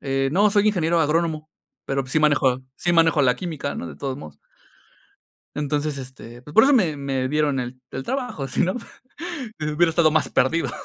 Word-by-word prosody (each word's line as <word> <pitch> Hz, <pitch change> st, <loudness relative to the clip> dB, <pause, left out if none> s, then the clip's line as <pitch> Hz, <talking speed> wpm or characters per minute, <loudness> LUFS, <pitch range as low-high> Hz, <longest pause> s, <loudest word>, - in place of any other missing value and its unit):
eh, 135 Hz, -1 st, 0 dB
no, 205 Hz, +5 st, +4 dB
soy 205 Hz, 0 st, +3 dB
ingeniero 170 Hz, -4 st, +1 dB
agrónomo, 155 Hz, 0 st, 0 dB, 0.4 s
pero 135 Hz, 0 st, -1 dB
sí 130 Hz, -, +1 dB
manejo 130 Hz, -4 st, +2 dB
sí 175 Hz, -, 0 dB
manejo 165 Hz, -2 st, +4 dB
la 125 Hz, -2 st, +3 dB
química, 155 Hz, -4 st, -4 dB
¿no?, -, -, -5 dB
de -, -, -9 dB
todos 135 Hz, -2 st, -4 dB
modos. 145 Hz, -, -11 dB, 1.2 s
Entonces, 150 Hz, 0 st, -1 dB
este, 125 Hz, -2 st, -10 dB
pues 150 Hz, +3 st, -12 dB
por 220 Hz, -, +8 dB
eso 285 Hz, -, +4 dB
me 180 Hz, -, +3 dB
me 135 Hz, -2 st, -2 dB
dieron 150 Hz, -2 st, +1 dB
el 125 Hz, +1 st, -6 dB
el 135 Hz, -, -5 dB
trabajo, 245 Hz, -, -3 dB
sino 180 Hz, +8 st, 0 dB, 0.9 s
hubiera 155 Hz, +3 st, +2 dB
estado 160 Hz, -1 st, +3 dB
más 155 Hz, -1 st, +1 dB
perdido. 165 Hz, +6 st, +1 dB
150 Hz, 175 wpm, -23 LUFS, 135-165 Hz, 1.2 s, por